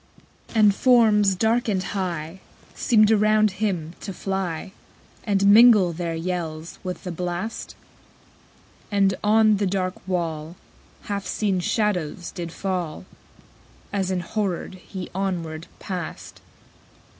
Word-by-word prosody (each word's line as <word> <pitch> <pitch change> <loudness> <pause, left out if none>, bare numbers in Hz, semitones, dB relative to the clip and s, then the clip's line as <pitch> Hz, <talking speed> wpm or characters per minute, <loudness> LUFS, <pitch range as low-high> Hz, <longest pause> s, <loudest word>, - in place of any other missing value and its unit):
12. - - -6
And 210 -2 +6
forms, 210 -5 +4
dark 230 +5 +1
and 190 -4 0
high, 180 -4 -4 0.3
_65 - - -18
Seemed 215 -4 +4
around 215 0 +4
him 185 -5 -2
to 195 - -6
fly, 190 -3 -3 0.5
And 200 -2 +2
mingle 205 -4 +7
their 165 0 -3
yells 165 -2 -4
with 180 -1 -5
the 180 - -4
blast: 180 +5 -4 1.1
And 195 -2 +3
on 215 0 +4
the 200 0 0
dark 185 -1 -1
wall 165 -3 -3 0.5
Half 200 -2 -4
seen 200 -4 0
shadows 180 -4 -1
did 170 -1 -6
fall, 180 -4 -3 0.9
As 195 -2 0
enhorrored 185 +1 -2
he 185 -3 -7
onward 170 -4 -3
passed. 95 - -6
190 Hz, 120 wpm, -24 LUFS, 175-210 Hz, 1.1 s, mingle